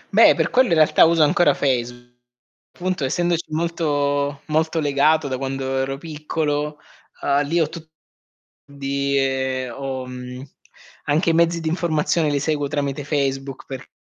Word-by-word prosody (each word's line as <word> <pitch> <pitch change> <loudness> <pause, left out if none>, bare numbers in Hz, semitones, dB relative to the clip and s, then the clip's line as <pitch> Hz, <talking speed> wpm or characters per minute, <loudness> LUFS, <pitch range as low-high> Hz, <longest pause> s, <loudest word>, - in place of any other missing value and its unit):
Beh, - - +7
per - - 0
quello 255 0 +4
in 170 - +3
realtà 155 -1 +5
uso 165 -1 +4
ancora 150 0 +3
Facebook. 120 -2 -1 0.7
Appunto, 180 -4 -2
essendoci 170 +5 0
molto 145 -3 -1
molto 160 +1 0
legato 150 +1 +2
da 130 -1 -2
quando 135 0 -3
ero 135 +1 -2
piccolo, 150 -1 -3 0.5
uhm, 140 0 +2
lì 170 +3 +1
ho 160 - +2
tutti, 165 -2 -10 0.8
quindi 135 -2 -1
ho 130 +1 -5
mhmm, 125 0 -8 0.6
anche 160 +3 +2
i - - 0
mezzi 170 0 +2
di 160 - -4
informazione 165 -1 0
li 145 -1 0
seguo 145 -1 -1
tramite 145 -1 -2
Facebook 135 -2 -2
perché 130 -1 -8
145 Hz, 145 wpm, -21 LUFS, 135-160 Hz, 0.8 s, Beh